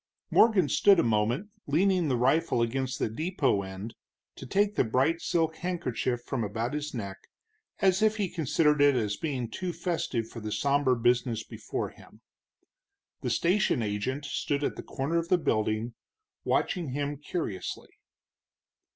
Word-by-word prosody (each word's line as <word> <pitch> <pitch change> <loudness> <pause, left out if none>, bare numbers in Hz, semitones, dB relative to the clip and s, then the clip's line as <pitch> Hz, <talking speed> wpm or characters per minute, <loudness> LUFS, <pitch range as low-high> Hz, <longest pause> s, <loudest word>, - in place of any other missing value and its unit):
Morgan 210 -8 +5
stood 195 +7 +5
a - - +4
moment, 115 - +1 0.2
leaning 180 +3 +2
the 130 -3 +1
rifle 130 0 +2
against 130 +2 -2
the - - 0
depot 135 - 0
end, 95 +4 -7 0.4
to - - -9
take 205 +8 +2
the - - +2
bright 135 +8 +1
silk 160 -1 0
handkerchief 130 -9 -2
from 130 -4 -2
about 110 +5 -2
his 150 0 -3
neck, 100 -7 -5 0.6
as 190 0 +3
if 215 0 +3
he 205 -3 0
considered 150 -3 +2
it 145 -1 +6
as 105 -4 0
being 130 -3 -3
too 180 +10 -4
festive 165 -9 -2
for 115 - -9
the 105 -1 -5
somber 140 +1 +2
business 120 -1 +1
before - - -4
him. - - -18 1.0
The - - -2
station 175 - +2
agent 110 +8 -2
stood 145 0 -1
at - - -1
the - - -6
corner 150 +5 -1
of 165 - -4
the 180 - +5
building, 110 -5 0 0.5
watching 165 -8 0
him 145 +1 -2
curiously. 145 - -4
140 Hz, 155 wpm, -28 LUFS, 115-170 Hz, 1.0 s, it